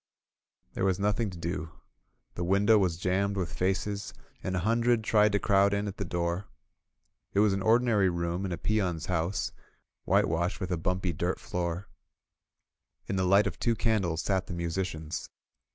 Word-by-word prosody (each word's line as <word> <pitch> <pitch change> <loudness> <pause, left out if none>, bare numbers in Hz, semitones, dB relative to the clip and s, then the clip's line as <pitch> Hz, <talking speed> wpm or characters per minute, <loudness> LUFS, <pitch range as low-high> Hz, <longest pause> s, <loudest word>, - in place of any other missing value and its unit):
There - - -2
was 95 -2 +2
nothing 105 +2 +1
to 90 - -9
do. 85 -1 -4 0.6
The 85 - -3
window 100 +4 +4
was 90 -4 +1
jammed 100 +3 0
with 90 -3 -2
faces, 95 +2 -2 0.3
and 95 - -2
a 90 - 0
hundred 115 +3 +2
tried 105 -1 +4
to - - +4
crowd 100 0 +3
in 100 +1 -1
at 100 - -6
the 100 - -3
door. 85 +2 -2 0.9
It - - +4
was 105 -1 +4
an 100 - -1
ordinary 110 -3 +3
room 85 +1 -2
in 95 - -3
a 85 - -2
peon^s 95 -7 0
house, 90 +1 -1 0.5
whitewashed, 85 +3 +1
with 95 -2 -4
a 90 - +1
hiunpy 90 0 -1
dirt 90 +4 -1
floor. 90 -4 -3 1.2
In 100 - -3
the 95 -1 +1
light 100 +3 +5
of - - -3
two 115 -1 +1
candles 100 -9 0
sat 95 -2 0
the - - -5
musicians. 85 -2 -3
95 Hz, 170 wpm, -29 LUFS, 85-100 Hz, 1.2 s, light